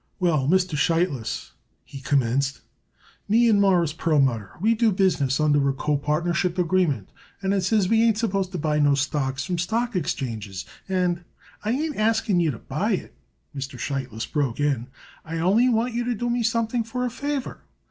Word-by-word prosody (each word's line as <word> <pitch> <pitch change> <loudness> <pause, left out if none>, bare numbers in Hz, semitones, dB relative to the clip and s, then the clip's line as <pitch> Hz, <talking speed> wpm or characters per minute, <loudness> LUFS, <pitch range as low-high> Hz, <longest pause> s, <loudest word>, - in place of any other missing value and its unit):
"Well, 155 -7 +2
Mr. 180 0 +2
Sheitlis," 150 -4 0 0.3
he 135 - -9
commenced, 135 0 0 0.7
"me 235 +3 +5
and 210 -3 +4
Mawruss 175 -6 +3
Perlmutter 135 - +1
we 220 +5 +3
do 225 -1 +2
business 170 -9 +1
under 145 -2 +3
a - - 0
copartnership 150 +6 0
agreement, 170 - +1 0.3
and 195 0 0
it 195 - +1
says 200 +1 +2
we 225 +3 +3
ain't 225 -2 +3
supposed 195 -5 -1
to - - -2
buy 150 -1 0
no 145 -1 +4
stocks 140 -1 -1
from 180 -2 -2
stock 230 +6 -1
exchanges, 110 - -3 0.2
and 180 -2 0 0.2
" - - -26
"I 210 - -2
ain't 295 +5 -1
asking 215 -3 +2
you 165 -2 +2
to 130 - -3
buy - - -2
it," - - -4 0.4
Mr. 135 -1 -5
Sheitlis 125 -4 -3
broke 140 -6 -2
in. 140 -5 0 0.4
"I 165 +1 -5
only 200 +9 +3
want 235 +1 +1
you 240 +1 -1
to 245 0 0
do 240 +2 -2
me 240 0 0
something 230 0 0
for 250 +3 -3
a 245 - -2
favor. 285 +1 -4
175 Hz, 180 wpm, -24 LUFS, 140-220 Hz, 0.7 s, me